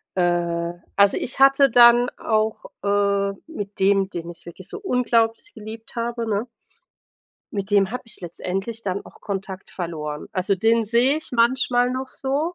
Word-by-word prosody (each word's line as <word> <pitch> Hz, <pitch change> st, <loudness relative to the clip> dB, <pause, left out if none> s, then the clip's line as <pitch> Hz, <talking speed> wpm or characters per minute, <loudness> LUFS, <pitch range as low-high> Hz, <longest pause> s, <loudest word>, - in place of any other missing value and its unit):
Äh, 175 Hz, -1 st, 0 dB, 0.2 s
also 200 Hz, 0 st, +4 dB
ich 255 Hz, -, -4 dB
hatte 275 Hz, 0 st, +6 dB
dann 240 Hz, +1 st, +7 dB
auch, 220 Hz, 0 st, -1 dB, 0.2 s
äh, 200 Hz, 0 st, +1 dB, 0.2 s
mit 205 Hz, -12 st, -7 dB
dem, 195 Hz, 0 st, +3 dB
den 170 Hz, -2 st, -6 dB
ich 170 Hz, -, -12 dB
wirklich 175 Hz, +2 st, -11 dB
so -, -, -6 dB
unglaublich 245 Hz, -, 0 dB
geliebt 220 Hz, +2 st, -10 dB
habe, 235 Hz, 0 st, -2 dB
ne? 210 Hz, +4 st, -1 dB, 1.1 s
Mit 200 Hz, 0 st, -3 dB
dem 200 Hz, -1 st, +3 dB
habe 250 Hz, -, -5 dB
ich 220 Hz, -, -11 dB
letztendlich 195 Hz, +6 st, -4 dB
dann 195 Hz, -2 st, -3 dB
auch -, -, -16 dB
Kontakt 195 Hz, -1 st, -5 dB
verloren. 155 Hz, -4 st, -5 dB
Also, 190 Hz, +2 st, +1 dB
den 225 Hz, +3 st, +2 dB
sehe 250 Hz, +7 st, +3 dB
ich 315 Hz, -, -13 dB
manchmal 245 Hz, +1 st, +2 dB
noch 260 Hz, +1 st, -4 dB
so, 290 Hz, +6 st, -2 dB
215 Hz, 160 wpm, -23 LUFS, 190-245 Hz, 1.1 s, dann